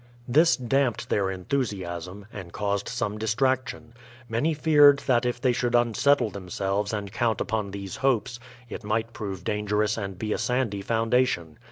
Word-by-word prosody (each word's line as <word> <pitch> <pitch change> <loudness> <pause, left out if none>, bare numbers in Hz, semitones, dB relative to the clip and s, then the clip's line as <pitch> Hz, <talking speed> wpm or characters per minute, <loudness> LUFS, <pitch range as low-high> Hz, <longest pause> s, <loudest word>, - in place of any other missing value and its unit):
This 155 +7 +4
damped 130 -1 0
their 100 -2 +1
enthusiasm, 95 -3 -3
and 95 -4 -8
caused 100 0 -2
some 105 +1 -3
distrac 130 +4 +1
tion. 120 -4 -9 0.3
Many 125 +8 0
feared 145 -2 +6
that 125 -2 +2
if 120 0 -2
they 125 0 +2
should 120 -1 0
unsettle 120 +1 +3
themselves 100 +2 -2
and 100 -2 -4
count 115 -2 0
upon 110 -3 -2
these 100 -1 -6
hopes, 125 -3 0 0.3
it 120 - -7
might 110 +2 -1
prove 95 -5 -5
dangerous 105 +1 0
and 100 -3 -5
be 105 +3 -2
a - - -3
sandy 125 -6 -1
foundation. 115 -7 0
110 Hz, 160 wpm, -26 LUFS, 100-125 Hz, 0.3 s, feared